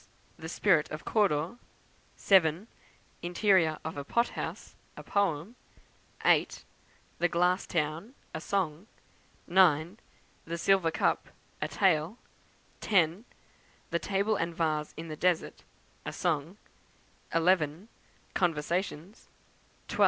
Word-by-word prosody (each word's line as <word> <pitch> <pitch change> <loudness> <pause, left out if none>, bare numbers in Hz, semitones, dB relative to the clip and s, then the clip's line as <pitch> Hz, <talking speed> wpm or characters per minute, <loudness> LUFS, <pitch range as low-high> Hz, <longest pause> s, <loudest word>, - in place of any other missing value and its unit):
The 160 - -8
Spirit 170 -4 +2
of 155 0 -7
Cawdor; 195 0 +1 0.6
7. 185 0 +3 0.5
Interior 175 -3 +2
of 160 -2 -5
a 140 - -3
Pothouse, 235 +11 -2 0.2
a - - -8
Poem; 200 +1 -1 0.7
8. - - +2 0.5
The 175 - +3
Glass 180 +3 +1
Town, 165 - -2 0.2
a 160 - -4
Song; 180 -1 -2 0.6
9. 175 +1 +3 0.5
The 170 +1 -4
Silver 190 -1 +3
Cup, 160 - 0 0.3
a - - 0
Tale; 180 +1 +1 0.6
10. 185 +1 +2 0.7
The 170 - +1
Table 200 +3 0
and 165 0 -2
Vase 155 -3 -1
in 165 +1 -6
the 155 - -5
Desert, 175 +1 0 0.4
a - - -4
Song; 165 +2 -1 0.8
11. 165 +1 +2 0.5
Conversations; 175 +3 -2 0.6
12. - - -6
170 Hz, 110 wpm, -30 LUFS, 155-195 Hz, 0.8 s, 7